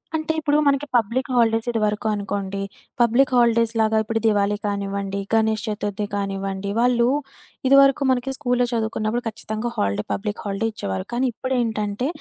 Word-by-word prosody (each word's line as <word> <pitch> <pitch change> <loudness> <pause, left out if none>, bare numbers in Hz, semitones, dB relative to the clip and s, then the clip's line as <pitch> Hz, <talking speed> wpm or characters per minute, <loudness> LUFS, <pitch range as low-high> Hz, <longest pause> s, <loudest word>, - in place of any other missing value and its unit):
అంటే 315 0 -1
ఇప్పుడు 295 -1 +2
మనకి 280 0 +2
పబ్లిక్ 240 +3 +1
హాలిడేస్ 225 -1 +2
ఇదివరకు 215 -1 0
అనుకోండి. 200 -1 -3 0.4
పబ్లిక్ 240 +3 +4
హాలిడేస్‌లాగా 230 -2 +3
ఇప్పుడు 225 +1 -1
దివాళీ 205 -1 +2
కానివ్వండి, 200 -1 -2
గణేష్ 220 -1 +2
చతుర్థి 205 -1 -2
కానివ్వండి. 195 0 -3
వాళ్ళు 240 0 +3 0.6
ఇదివరకు 275 +1 +6
మనకి 255 +1 0
స్కూల్లో 250 -3 +1
చదువుకున్నప్పుడు 220 +1 -1
ఖచ్చితంగా 220 +1 -4
హాలిడే 100 +1 0
పబ్లిక్ 205 0 -4
హాలిడే 200 +2 -1
ఇచ్చేవారు. 95 - -4
కానీ 250 +2 +1
ఇప్పుడేంటంటే 230 -2 -1
220 Hz, 135 wpm, -22 LUFS, 205-245 Hz, 0.6 s, ఇదివరకు